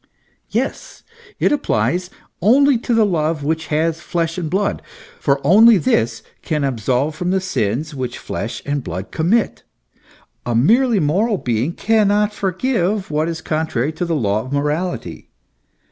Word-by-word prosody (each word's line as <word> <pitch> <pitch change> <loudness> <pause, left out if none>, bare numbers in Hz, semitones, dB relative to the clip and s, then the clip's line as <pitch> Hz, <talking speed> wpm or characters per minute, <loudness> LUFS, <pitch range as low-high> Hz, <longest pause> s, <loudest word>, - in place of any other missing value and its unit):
Yes, - - -3 0.4
it - - +2
applies 185 -10 0 0.3
only 260 +6 +4
to 235 0 -1
the 225 -1 +4
love 160 -5 -1
which 160 +1 -1
has 160 +2 0
flesh 165 -2 -2
and 165 -3 -3
blood, 195 +4 -1 0.4
for 140 -1 +1
only 215 +7 +7
this 115 -8 0 0.2
can 150 -3 -2
absolve 130 +3 0
from 180 +3 -2
the 190 +1 +2
sins 150 - -2
which 130 -3 -4
flesh - - -5
and 145 -1 -2
blood 90 +4 -6
commit. 195 +8 +1 0.8
A 120 - -2
merely 225 - +4
moral 195 +8 +1
being 125 +3 -1
cannot 210 0 +2
forgive 195 -1 -1
what 155 +2 0
is 165 -1 -5
con 160 0 -1
trary 140 +2 -2
to 170 - -3
the 170 -1 -1
law 105 -6 0
of 130 - -9
morality. 150 +5 -3
165 Hz, 150 wpm, -19 LUFS, 145-205 Hz, 0.8 s, only